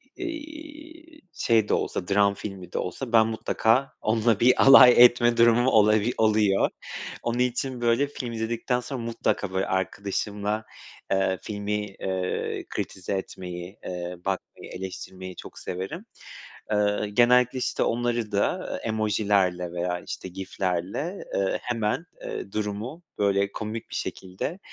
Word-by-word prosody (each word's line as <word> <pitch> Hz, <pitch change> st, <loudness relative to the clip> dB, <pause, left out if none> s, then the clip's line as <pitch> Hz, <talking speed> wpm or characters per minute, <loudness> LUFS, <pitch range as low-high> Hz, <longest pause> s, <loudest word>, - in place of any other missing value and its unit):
iii, 315 Hz, -1 st, -9 dB
şey 110 Hz, -6 st, +2 dB
de -, -, +2 dB
olsa, 90 Hz, -, -1 dB
dram 100 Hz, 0 st, +3 dB
filmi 95 Hz, -3 st, -8 dB
de -, -, -2 dB
olsa 120 Hz, +7 st, -4 dB
ben 110 Hz, -1 st, +6 dB
mutlaka 115 Hz, +3 st, +1 dB
onunla 110 Hz, -1 st, +2 dB
bir 125 Hz, +2 st, +5 dB
alay 130 Hz, -2 st, +10 dB
etme 120 Hz, -1 st, +3 dB
durumum 120 Hz, +2 st, +5 dB
olabi 110 Hz, 0 st, +4 dB
oluyor. 105 Hz, -3 st, +3 dB, 0.5 s
Onun 120 Hz, +1 st, -1 dB
için, 125 Hz, 0 st, -1 dB
böyle, 120 Hz, +4 st, +3 dB
film 125 Hz, -4 st, -6 dB
izledikten 115 Hz, +2 st, -1 dB
sonra 125 Hz, +1 st, -5 dB
mutlaka, 115 Hz, -4 st, -1 dB
böyle, 95 Hz, +1 st, +1 dB
arkadaşımla, 100 Hz, +3 st, -2 dB, 0.5 s
eee, 95 Hz, -1 st, +2 dB
filmi, 105 Hz, 0 st, -4 dB, 0.3 s
eee, 95 Hz, -1 st, -2 dB
kritize 95 Hz, +1 st, -4 dB
etmeyi, 90 Hz, -1 st, -6 dB
eee, 90 Hz, 0 st, -4 dB
bakmayı, 95 Hz, -1 st, -4 dB
eleştirmeyi 95 Hz, 0 st, -7 dB
çok -, -, -10 dB
severim. 95 Hz, -, -5 dB, 0.7 s
Eee, 105 Hz, 0 st, +1 dB
genellikle, 125 Hz, +2 st, +4 dB
işte, -, -, -1 dB
onları 120 Hz, -2 st, 0 dB
da, 100 Hz, -, 0 dB
eee, -, -, -4 dB
emojilerle 100 Hz, -5 st, +1 dB
veya, 90 Hz, 0 st, -2 dB
işte, -, -, -6 dB
GIF'lerle, 95 Hz, -, -3 dB
eee, 95 Hz, -1 st, +1 dB
hemen, 115 Hz, +6 st, -1 dB, 0.2 s
eee, 100 Hz, -, -6 dB
durumu, 110 Hz, +9 st, -4 dB, 0.2 s
böyle, 100 Hz, 0 st, +2 dB
komik 110 Hz, +1 st, -5 dB
bir -, -, -4 dB
şekilde, 95 Hz, -, -4 dB
110 Hz, 130 wpm, -26 LUFS, 95-120 Hz, 0.7 s, alay